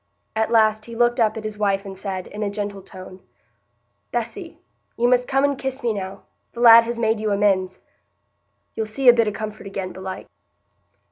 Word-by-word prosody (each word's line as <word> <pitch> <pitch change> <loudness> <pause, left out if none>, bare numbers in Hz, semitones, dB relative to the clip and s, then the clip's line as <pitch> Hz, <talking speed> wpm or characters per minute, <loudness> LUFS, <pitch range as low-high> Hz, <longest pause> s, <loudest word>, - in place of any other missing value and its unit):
At 220 0 0
last 215 -1 +3
he 235 - -9
looked 240 +1 +2
up 220 -1 +2
at 220 - -6
his 215 -1 -6
wife 200 -1 0
and 195 -1 -7
said, 190 -1 -5
in 210 - -8
a 205 - -1
gentle 200 -1 -5
tone: 185 0 -12 0.9
"Bessy, - - -5 0.4
you 240 +1 +2
must 250 0 +2
come 270 +1 +1
and 285 0 +2
kiss 265 +1 -5
me 235 -2 +1
now—the 195 +4 -9
lad 230 -1 +8
has 235 0 -4
made 225 -1 +1
you 215 0 -1
amends. 200 -2 +1 0.9
You'll 220 -1 -3
see 250 +5 -2
a - - +9
bit 230 -2 +2
o' - - 0
comfort 215 0 -7
again, 195 -1 -5
belike." 190 +1 -7
215 Hz, 190 wpm, -22 LUFS, 195-235 Hz, 0.9 s, a